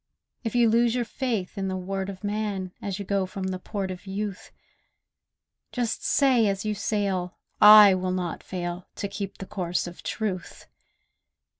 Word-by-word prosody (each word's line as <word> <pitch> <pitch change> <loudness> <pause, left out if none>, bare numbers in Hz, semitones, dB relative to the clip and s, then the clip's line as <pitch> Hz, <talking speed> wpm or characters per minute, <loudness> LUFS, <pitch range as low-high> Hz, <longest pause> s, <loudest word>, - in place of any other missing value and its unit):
If 225 0 -3
you 240 -1 +5
lose 235 +1 +3
your 245 -1 0
faith 220 -6 -3
in 195 - -1
the 190 0 -2
word 190 +1 -3
of 195 +1 -9
man 205 -3 -2
As 195 -2 -3
you 200 - -6
go 195 -1 0
from 190 +1 -6
the 185 -1 -3
port 195 0 -4
of 185 +2 -9
youth, 200 0 -4 1.2
Just 240 -2 -2
say 255 -6 +4
as 195 +1 -1
you 215 - 0
sail, 195 -4 -2 0.2
'I 210 -1 +10
will 185 0 -1
not 180 -2 -2
fail 175 -1 -5
To 200 - -3
keep 195 -1 -5
to - - -38
the 195 - -8
course 180 -4 -1
of 175 0 -9
truth! 190 -6 -4
195 Hz, 175 wpm, -26 LUFS, 185-215 Hz, 1.2 s, I